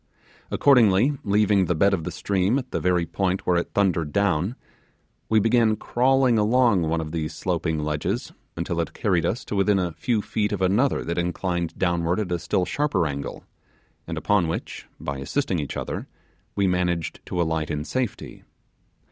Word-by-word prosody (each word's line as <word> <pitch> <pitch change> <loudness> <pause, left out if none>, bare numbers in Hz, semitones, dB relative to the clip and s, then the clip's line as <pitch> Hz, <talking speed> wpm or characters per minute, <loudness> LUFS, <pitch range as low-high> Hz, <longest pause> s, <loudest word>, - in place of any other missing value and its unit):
Accordingly, 125 -1 +4
leaving 100 -1 +3
the 90 - 0
bed 100 +5 +3
of 85 -5 -1
the - - -2
stream 100 +4 0
at 130 -2 -5
the - - -1
very 90 -2 +1
point 95 +2 -1
where 90 - +3
it 85 - -1
thundered 85 -6 +1
down, 100 +2 +1 0.7
we 110 - +4
began 115 0 +3
crawling 125 +1 +2
along 115 -2 +3
one 85 +1 0
of 80 -1 -5
those 80 -2 -3
sloping 80 -1 -1
ledges 75 0 -2 0.3
until 85 0 -2
it 85 - -5
carried 90 -5 +1
us 110 - -3
to - - -4
within 100 0 +3
a 90 -2 0
few 105 +6 -1
feet 105 -1 -1
of 105 - -2
another 105 +9 +2
that 85 +1 -2
inclined 85 -1 -2
downwards 85 +2 +1
at 90 - -8
a 85 - 0
still 90 +3 0
sharper 145 - 0
angle, 70 -1 -5 0.6
and - - -4
upon 100 -5 +2
which, 80 - -5
by 70 -1 -4
assisting 95 - -1
each 70 -3 -4
other - - -4 0.5
we 100 - +2
managed 90 -3 0
to 90 - -3
alight 80 -2 0
in 75 0 -3
safety. 130 0 -4
95 Hz, 175 wpm, -24 LUFS, 85-105 Hz, 0.7 s, Accordingly